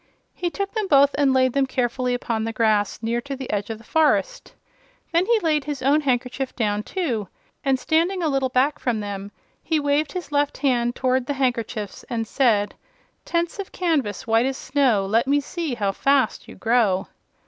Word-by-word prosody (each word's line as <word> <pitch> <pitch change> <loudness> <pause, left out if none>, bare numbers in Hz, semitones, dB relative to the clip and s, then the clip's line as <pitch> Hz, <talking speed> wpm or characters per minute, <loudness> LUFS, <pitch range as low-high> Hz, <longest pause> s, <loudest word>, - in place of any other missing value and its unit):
He 355 - -2
took 395 +3 -4
them 435 -3 -1
both 280 -3 +5
and 285 -1 +3
laid 255 -1 +3
them 275 -1 +2
carefully 250 -1 -1
upon 230 -2 -2
the 225 - -2
grass 215 -2 +1
near 235 +1 0
to 280 +2 -5
the 265 -1 -6
edge 205 0 -2
of 225 - -4
the 225 - -16
forest. 320 - +1 0.6
Then 340 +2 +2
he 470 -1 +4
laid 305 -4 +1
his 290 -3 -4
own 285 +3 +4
handkerchief 255 -1 -1
down, 210 -3 0
too, 235 - -2 0.4
and 270 -2 +2
standing 335 +7 +1
a - - +2
little 270 -3 +1
back 260 +4 +1
from 240 -4 -1
them 200 -1 -5 0.3
he 320 -2 0
waved 290 +1 0
his 360 -4 -5
left 290 0 +1
hand 240 -3 +1
toward 255 -1 0
the 285 - 0
handkerchiefs 235 -6 -2
and 230 -2 -2
said: 220 -4 +2 0.5
"Tents 340 +3 -1
of 395 - -5
canvas, 300 - -1
white 225 +2 +3
as 270 0 -2
snow, 260 -8 +1
Let 225 +6 +1
me 285 +1 +3
see 310 -1 -4
how 200 -4 0
fast 275 +6 +1
you - - -11
grow!" 225 -5 +2
260 Hz, 190 wpm, -23 LUFS, 230-290 Hz, 0.6 s, both